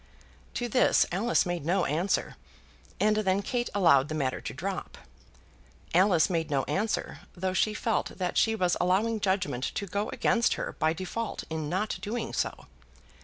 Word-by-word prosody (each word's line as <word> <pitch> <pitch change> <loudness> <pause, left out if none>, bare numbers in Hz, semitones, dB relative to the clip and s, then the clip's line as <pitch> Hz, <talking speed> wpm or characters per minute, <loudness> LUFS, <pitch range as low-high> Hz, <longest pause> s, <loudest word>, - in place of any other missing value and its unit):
To 240 - -1
this 250 +2 +4
Alice 200 +6 +2
made 175 -3 -2
no 180 +3 +1
answer, 165 +7 0 0.6
and 215 0 +3
then 200 -1 +1
Kate 240 +3 -1
allowed 155 -8 +5
the 155 - -3
matter 135 -4 -1
to - - -5
drop. - - -5 1.0
Alice 180 -2 +5
made 165 -3 -1
no 140 -2 +1
answer, 210 +2 -2 0.2
though 185 +1 -2
she 210 +3 +1
felt 225 +1 -1
that 180 -2 -2
she 225 0 +3
was 180 -4 +1
allowing 205 +5 +2
judgement 190 -11 0
to 200 - -2
go 200 +3 -2
against 240 -1 +2
her - - -5
by 155 +1 +3
default 190 +6 -4
in 155 -2 -3
not 190 +5 -1
doing 230 +3 -3
so. - - -2
190 Hz, 165 wpm, -28 LUFS, 165-215 Hz, 1.0 s, allowed